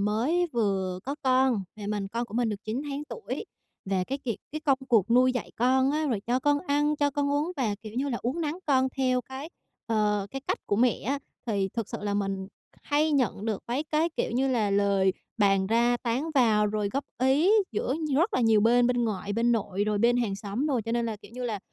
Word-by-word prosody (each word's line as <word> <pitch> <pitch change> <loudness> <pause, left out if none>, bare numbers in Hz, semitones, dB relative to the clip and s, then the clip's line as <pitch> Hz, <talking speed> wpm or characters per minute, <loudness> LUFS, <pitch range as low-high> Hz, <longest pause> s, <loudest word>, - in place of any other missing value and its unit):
mới 240 - +1
vừa 195 -5 0
có 275 - -2
con, 260 -4 +3 0.2
và 210 -2 -7
mình 205 -1 -2
con 235 +4 -2
của 215 - -11
mình 240 -1 +1
được 210 -1 -5
9 225 +6 -3
tháng 290 0 -4
tuổi, 450 +9 -6 0.4
và 190 -1 0
cái 275 +8 -3
kiệt 240 -6 -3 0.2
cái 310 - -4
công 275 -4 +2
cuộc 225 -4 +3
nuôi 255 +2 +5
dạy 250 -4 -4
con 260 +3 +3
á 305 +1 0
rồi 235 -8 0
cho 245 +2 +2
con 290 +1 +3
ăn, 295 -2 +1
cho 290 -1 +2
con 285 0 -1
uống 295 +5 0
và, 230 -7 0
kiểu 215 -1 -8
như 270 +4 -1
là, 240 - -2
uốn 255 +8 -1
nắn 305 -1 -1
con 265 -2 +3
theo 255 -2 +2
cái, 265 +5 -8 0.4
ờ, 210 -3 +1
cái 270 - -5
cách - - -2
của 205 - +1
mẹ 240 0 +2
á, 280 +3 0 0.3
thì 200 -4 0
thực 230 -3 -3
sự - - -5
là 205 -1 -1
mình 195 -1 -2 0.3
hay 300 +1 +1
nhận 250 -7 0
được 220 -3 -2
mấy 260 +6 -1
cái, 310 +2 +1
kiểu - - 0
như 260 +3 +1
là, 225 -6 +1
lời 200 -1 +3 0.3
bàn 195 -2 +3
ra 235 +3 +3
tán 250 +7 -2
vào, 220 -5 +4
rồi 210 -1 -1
góp 275 +8 -2
ý 270 +8 +3 0.2
giữa 235 +4 -1 0.2
rất 335 +10 +2
là - - +2
nhiều 225 -2 +4
bên, 240 +3 +4
bên 245 -1 +1
ngoại, 205 -2 -3
bên 235 +3 +2
nội 205 -3 -1
rồi 210 -1 0
bên 235 +3 +4
hàng 225 -5 0
xóm 205 +7 -3
đồ. 270 -6 +1
Cho 230 - -3
nên 235 0 0
là, 220 - -3
kiểu 205 - -16
như 250 0 -4
là, 220 -4 -2
240 Hz, 240 wpm, -27 LUFS, 210-270 Hz, 0.4 s, nuôi